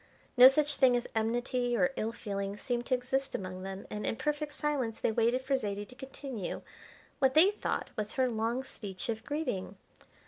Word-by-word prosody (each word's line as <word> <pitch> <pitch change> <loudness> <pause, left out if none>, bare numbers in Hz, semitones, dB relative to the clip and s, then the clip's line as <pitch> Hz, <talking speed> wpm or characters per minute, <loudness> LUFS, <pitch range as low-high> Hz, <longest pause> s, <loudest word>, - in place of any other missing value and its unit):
No 250 0 +11
such 290 +1 +3
thing 255 -3 +5
as 240 - -3
enmity 240 +2 0
or 270 - +3
ill 220 - -1
feeling 200 -3 -4
seemed 240 +2 -2
to 255 - +3
exist 265 +2 -1
among 185 -1 -5
them, 190 +1 -6
and, 210 - -4
in - - 0
perfect 300 +3 -2
silence, 270 -6 -1
they - - +1
waited 235 +3 +2
for 270 +1 +1
Zaidie 205 -5 -2
to 250 - -15
continue 265 -5 -6 0.6
what 265 -1 +3
they 355 +6 +7
thought 420 - -3
was 215 -1 -3
her 260 -1 +2
long 230 +2 -1
speech 205 -2 -5
of 220 -1 -2
greeting. 235 -10 -3
245 Hz, 185 wpm, -31 LUFS, 215-270 Hz, 0.6 s, No